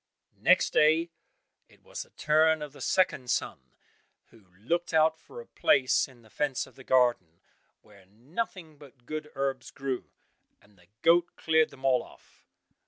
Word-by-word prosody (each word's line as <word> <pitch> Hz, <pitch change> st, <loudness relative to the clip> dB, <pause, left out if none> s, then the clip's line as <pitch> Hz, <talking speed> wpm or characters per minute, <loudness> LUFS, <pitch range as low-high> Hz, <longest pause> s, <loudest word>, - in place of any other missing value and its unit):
Next -, -, +3 dB
day 160 Hz, +2 st, +3 dB, 0.6 s
it -, -, -24 dB
was -, -, -7 dB
the -, -, -11 dB
turn 155 Hz, 0 st, +2 dB
of 145 Hz, -2 st, -9 dB
the -, -, -13 dB
second 155 Hz, -9 st, +1 dB
son, -, -, -1 dB, 0.7 s
who 110 Hz, -5 st, -21 dB
looked 165 Hz, -, -2 dB
out 160 Hz, 0 st, +3 dB
for 480 Hz, -, -12 dB
a 475 Hz, -, -10 dB
place 130 Hz, -, +2 dB
in 125 Hz, -3 st, -19 dB
the 110 Hz, -, -20 dB
fence 140 Hz, -3 st, -1 dB
of -, -, -18 dB
the 130 Hz, -, -14 dB
garden, 120 Hz, -11 st, +1 dB, 0.4 s
where 100 Hz, -3 st, -20 dB
nothing 155 Hz, -, -6 dB
but 135 Hz, -4 st, -17 dB
good 155 Hz, +2 st, -6 dB
herbs 135 Hz, -2 st, -3 dB
grew, 135 Hz, -2 st, -5 dB, 0.5 s
and 105 Hz, 0 st, -26 dB
the 90 Hz, -2 st, -25 dB, 0.2 s
goat 170 Hz, +1 st, +3 dB
cleared 160 Hz, -1 st, +2 dB
them 135 Hz, 0 st, -11 dB
all 130 Hz, -2 st, +3 dB
off. -, -, -19 dB
140 Hz, 165 wpm, -28 LUFS, 125-160 Hz, 0.7 s, Next